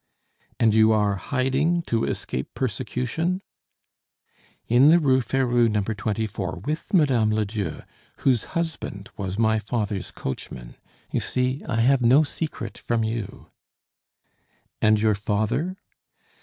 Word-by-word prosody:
"And 110 -2 +4
you 110 0 +5
are 105 -2 +2
hiding 140 - 0
to 115 -7 0
escape 65 - -4
persecution?" 130 - -2 1.2
"In 125 +5 +5
the 165 - +7
Rue 135 -5 +3
Ferou, 120 -1 +2
No. 105 -1 0
24, 105 -1 -3
with 155 +2 -3
Mme. 135 - +3
Ledieu, 105 -7 -2 0.4
whose 125 -5 +2
husband 160 -12 -4
was 95 -1 -4
my 110 -1 +3
father's 105 -3 -3
coachman. 65 -2 -7 0.4
You - - +1
see, 130 +2 -1
I 115 -2 +1
have 130 +2 +4
no 130 +6 +6
secret 155 +1 -5
from 115 -1 0
you." 110 -2 -5 1.3
"And 110 -1 +4
your 110 0 +3
father?" 110 - -1
115 Hz, 120 wpm, -24 LUFS, 105-135 Hz, 1.3 s, the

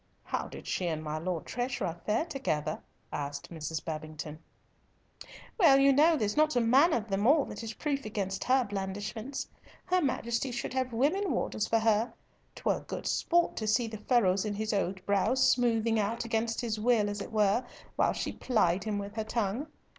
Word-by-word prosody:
"How - - -3
did - - -10
she 180 - -1
and 155 -2 -2
my 155 0 -3
Lord 170 0 -3
Treasurer 240 -9 -3
fare 220 +9 +2
together?" 250 - -2 0.3
asked 140 +1 -5
Mrs. 160 0 -4
Babington. 155 -1 -6 1.2
"Well, 280 -8 +7
you 275 0 +6
know 315 +4 +5
there's 210 -5 -1
not 305 -1 +3
a - - +4
man 260 +8 +5
of 230 -6 0
them 200 +2 0
all 290 0 +5
that - - -7
is 225 -1 -6
proof 280 -2 -2
against 200 -3 -3
her 260 0 +4
blandishments. 205 +5 -4 0.4
Her 365 0 +2
Majesty 250 -3 -1
should 240 +1 -4
have 260 -1 -1
women 310 - +1
warders 215 -3 -1
for 225 - +3
her. 225 +1 +2 0.4
'Twas - - 0
good - - -5
sport 345 0 +2
to 215 - -2
see 225 +3 +3
the 220 -2 -6
furrows 200 -5 +2
in 210 -2 -2
his 215 +1 -2
old 190 -1 -1
brow 200 +5 +2
smoothing 230 -3 +3
out 225 +3 -1
against 230 +1 -1
his 225 -3 -2
will 220 -2 +3
as 205 0 -3
it - - -7
were, 215 +2 +2 0.3
while - - +2
she - - -3
plied 195 -7 +1
him 215 -2 -1
with 200 +1 -6
her 220 - 0
tongue. 225 +5 -2
220 Hz, 185 wpm, -30 LUFS, 195-255 Hz, 1.2 s, Well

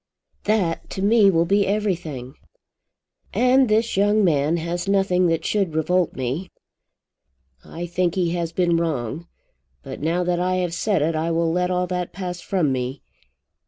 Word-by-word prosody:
"That 200 -6 0
to 190 - -4
me 210 -1 +5
will 165 -2 +2
be 200 +3 +2
everything." 170 -11 -2 1.0
"And 255 0 +4
this 220 +2 +1
young 205 +2 +3
man 155 -2 +2
has 170 +2 -3
nothing 195 -2 +2
that 165 -1 -1
should 195 -7 0
revolt 175 +2 +1
me. 135 +9 -3 1.1
I 170 +2 -7
think 175 0 -1
he 175 -3 +1
has 170 -1 -2
been 175 -1 +1
wrong. 160 -1 -3 0.6
But - - -8
now 170 +4 0
that 175 0 0
I 185 +1 0
have 180 -2 -1
said 185 -2 0
it 165 +2 0
I 160 +2 -1
will 165 0 +1
let 180 +1 0
all 180 0 0
that 180 -1 -4
pass 180 -1 -5
from 175 -8 0
me. 130 +1 -3
175 Hz, 160 wpm, -22 LUFS, 165-195 Hz, 1.1 s, me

